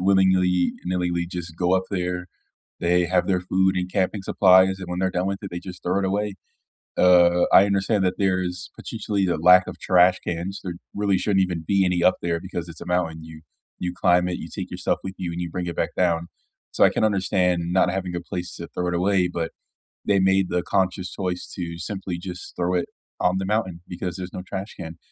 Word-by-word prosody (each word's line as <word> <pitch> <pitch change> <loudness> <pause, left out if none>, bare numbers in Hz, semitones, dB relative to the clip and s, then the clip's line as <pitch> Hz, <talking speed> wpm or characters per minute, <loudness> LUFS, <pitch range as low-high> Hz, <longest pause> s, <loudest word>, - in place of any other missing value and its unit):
willingly-nilly 90 -1 +2
would 85 0 -2
just 85 -2 -6
go 90 +1 +2
up 95 0 +1
there, 90 -1 -2 0.5
they 85 0 +2
have 90 +2 +1
their 90 -2 +2
food 95 +1 +1
and 90 0 -2
camping 95 +1 0
supplies, 95 0 +4
and 90 - -7
when 90 0 -3
they're 95 0 +1
done 90 +2 0
with 100 - -2
it, 100 - -6
they 85 - -4
just 90 0 -10
throw 90 +2 +1
it - - -1
away. 100 +1 -1 0.6
Uh, 90 -1 +5
I 100 - +8
understand 100 0 +1
that 90 - +1
there's 90 -2 -1
potentially 105 -4 -2
a 85 - +1
lack 90 +3 +6
of - - -8
trash 90 0 +4
cans, 85 +3 -4
there 90 -3 -5 0.2
really 100 -2 +1
shouldn't 95 -1 +2
even 85 -3 -2
be 100 -1 +3
any 90 -1 +1
up 90 - +5
there 85 -1 -1
because 85 0 -6
it's 85 - -10
a - - -8
mountain, 80 -3 -1
you 80 -1 -12 0.4
you 90 0 -3
climb 90 0 +3
it, 90 - -3
you - - -7
take - - -5
yourself - - -1
with 95 - -5
you, 90 -2 -3
and 85 - -5
you 85 - -4
bring 90 +1 -4
it 85 - -5
back - - -1
down, 85 -2 +1 0.4
so - - +3
I - - +8
can - - 0
understand 90 -4 +1
not 90 -1 +3
having 95 -1 -3
a 85 - -2
place 90 0 -5
to - - -7
throw 90 - -3
it 90 - -1
away, 90 +1 +2
but 85 -2 -3 0.5
they 100 -1 +2
made 95 -1 +3
the 90 -1 0
conscious 95 -1 0
choice 90 -2 -3
to 85 -2 -5
simply, 95 -1 -4
just, 90 0 -8
throw 90 +1 0
it 90 - 0 0.3
on 90 +1 +2
the 95 - -2
mountain 95 -5 -1
because 90 -1 -5
there's 90 -1 -7
no - - -5
trash 95 +3 -6
can. 80 -2 -8
90 Hz, 220 wpm, -24 LUFS, 90-95 Hz, 0.6 s, I